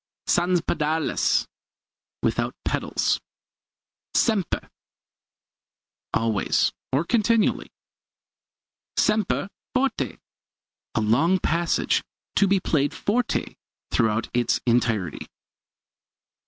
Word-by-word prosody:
Sans 175 Hz, +1 st, +3 dB
pedales 160 Hz, 0 st, +1 dB, 0.8 s
without -, -, 0 dB
pedals. -, -, 0 dB, 0.9 s
Sempre 210 Hz, -7 st, +1 dB, 1.4 s
always, 115 Hz, -2 st, +1 dB, 0.2 s
or 135 Hz, +4 st, +2 dB
continually. 230 Hz, +1 st, +2 dB, 1.3 s
Sempre 210 Hz, -1 st, +1 dB, 0.2 s
forte 270 Hz, +2 st, 0 dB, 0.8 s
a 110 Hz, -, +2 dB
long 125 Hz, -, +3 dB
passage 170 Hz, -1 st, +1 dB, 0.3 s
to 200 Hz, -, +4 dB
be 195 Hz, 0 st, +3 dB
played 145 Hz, -5 st, 0 dB
forte 230 Hz, +3 st, -1 dB, 0.4 s
throughout 110 Hz, -1 st, +1 dB
its 120 Hz, 0 st, +2 dB
entirety. 115 Hz, -, 0 dB
165 Hz, 75 wpm, -24 LUFS, -, 1.4 s, to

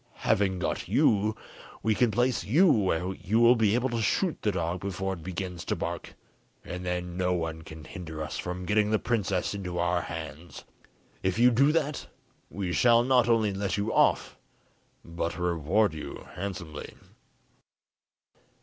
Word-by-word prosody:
Having 95 Hz, -2 st, +2 dB
got 90 Hz, -, -2 dB
you, 105 Hz, +1 st, +3 dB, 0.5 s
we 110 Hz, -, +3 dB
can 120 Hz, +2 st, +3 dB
place 120 Hz, +2 st, +1 dB
you 150 Hz, -, +4 dB
where 95 Hz, -, +1 dB
you 110 Hz, +4 st, 0 dB
will 120 Hz, +1 st, +7 dB
be 110 Hz, -2 st, +3 dB
able 125 Hz, +2 st, +1 dB
to 115 Hz, -1 st, -1 dB
shoot 165 Hz, -, 0 dB
the 105 Hz, -, +1 dB
dog 85 Hz, -1 st, -2 dB
before 95 Hz, 0 st, -3 dB
it 85 Hz, -, -8 dB
begins 90 Hz, 0 st, -5 dB
to -, -, -1 dB
bark, -, -, -5 dB, 0.5 s
and 90 Hz, 0 st, -6 dB
then 90 Hz, -1 st, -3 dB
no 90 Hz, 0 st, +1 dB
one 80 Hz, -2 st, -3 dB
can 80 Hz, 0 st, -11 dB
hinder 80 Hz, -6 st, -7 dB
us 75 Hz, -, -5 dB
from 90 Hz, +1 st, -4 dB
getting 105 Hz, +2 st, +2 dB
the 110 Hz, -, +3 dB
princess 105 Hz, -6 st, -1 dB
into 90 Hz, -3 st, -5 dB
our 85 Hz, 0 st, +1 dB
hands. 80 Hz, +1 st, -8 dB, 0.6 s
If 95 Hz, +1 st, 0 dB
you 125 Hz, +2 st, +6 dB
do 135 Hz, +5 st, +4 dB
that, 150 Hz, -3 st, -1 dB, 0.4 s
we 90 Hz, +1 st, -3 dB
shall 120 Hz, +2 st, +5 dB
not 125 Hz, -2 st, +3 dB
only 110 Hz, -3 st, +3 dB
let 100 Hz, 0 st, -2 dB
you 105 Hz, +2 st, -1 dB
off, -, -, +2 dB, 0.7 s
but 85 Hz, -1 st, -3 dB
reward 90 Hz, +3 st, +1 dB
you 80 Hz, -, -7 dB
handsomely." 90 Hz, -5 st, -6 dB
95 Hz, 160 wpm, -28 LUFS, 90-110 Hz, 0.7 s, will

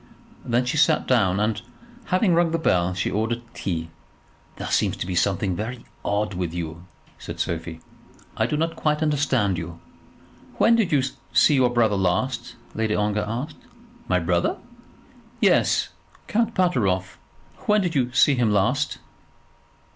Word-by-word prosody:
Then 120 Hz, +1 st, +1 dB
she 125 Hz, +5 st, -1 dB
sat 155 Hz, +1 st, +3 dB
down, 100 Hz, -7 st, +3 dB
and, 105 Hz, 0 st, 0 dB, 0.4 s
having 185 Hz, 0 st, +2 dB
rung 170 Hz, 0 st, +3 dB
the 165 Hz, -, 0 dB
bell, 90 Hz, -, +1 dB
she 95 Hz, -, -1 dB
ordered 115 Hz, +3 st, -1 dB
tea. 80 Hz, -3 st, -4 dB, 0.6 s
"There -, -, -6 dB
seems -, -, +1 dB
to -, -, -3 dB
be 90 Hz, -, -4 dB
something 95 Hz, +1 st, +1 dB
very 115 Hz, +5 st, -5 dB, 0.2 s
odd 105 Hz, 0 st, -1 dB
with 90 Hz, -2 st, -3 dB
you," 85 Hz, 0 st, -5 dB, 0.3 s
said -, -, -8 dB
Sophie. 80 Hz, -1 st, -3 dB, 0.5 s
"I -, -, +1 dB
do 150 Hz, -, -1 dB
not 165 Hz, +1 st, -1 dB
quite 150 Hz, 0 st, 0 dB
understand 135 Hz, -, +1 dB
you." 85 Hz, 0 st, -7 dB, 0.8 s
"When 230 Hz, -, +5 dB
did 220 Hz, -6 st, +1 dB
you 140 Hz, -3 st, +3 dB, 0.3 s
see 150 Hz, -, +5 dB
your 130 Hz, -3 st, +4 dB
brother 115 Hz, -4 st, +2 dB
last?" 120 Hz, +7 st, -1 dB, 0.2 s
Lady 110 Hz, -1 st, 0 dB
Ongar 105 Hz, 0 st, 0 dB
asked. 125 Hz, +8 st, -4 dB, 0.5 s
"My 90 Hz, -, +2 dB
brother?" 85 Hz, +1 st, 0 dB, 0.8 s
"Yes, -, -, +3 dB, 0.4 s
Count 230 Hz, +1 st, 0 dB
Pateroff. 100 Hz, -, 0 dB, 0.5 s
When 210 Hz, 0 st, +4 dB
did 175 Hz, -3 st, -1 dB
you 125 Hz, -4 st, +1 dB
see 130 Hz, +4 st, +5 dB
him 120 Hz, -4 st, +2 dB
last?" 125 Hz, +9 st, +1 dB
115 Hz, 150 wpm, -24 LUFS, 95-150 Hz, 0.8 s, When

